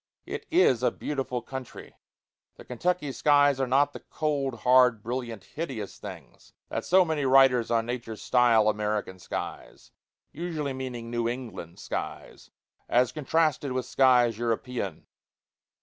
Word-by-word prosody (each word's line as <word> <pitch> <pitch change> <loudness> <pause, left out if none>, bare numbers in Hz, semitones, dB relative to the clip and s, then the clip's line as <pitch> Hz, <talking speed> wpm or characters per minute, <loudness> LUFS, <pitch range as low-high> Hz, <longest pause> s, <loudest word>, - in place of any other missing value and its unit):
It - - -6
is 320 - +4
a 125 - +3
beautiful 130 -4 -4
country; 130 0 -9 0.6
the - - -14
Kentucky 150 +4 -1
skies 145 -1 +3
are 135 - 0
not 140 +3 +3
the - - -7
cold, 140 -6 -3
hard, 125 -3 +4
brilliant, 115 -3 -4
hideous 130 - -6
things - - -11 0.2
that - - -3
so 185 0 +4
many 160 -3 -1
writers 130 -3 +5
on 115 -1 +1
nature 120 -2 -5
style 115 -2 +3
American 105 -3 -1
skies - - -7 0.4
(usually 155 -4 -4
meaning 125 -3 -6
New 120 -1 0
England 120 -9 -7
skies), - - -6 0.4
as 125 0 +3
contrasted 150 -2 0
with 130 -1 -2
skies 125 -4 +3
European. 115 -5 -3
125 Hz, 135 wpm, -27 LUFS, 115-140 Hz, 0.6 s, writers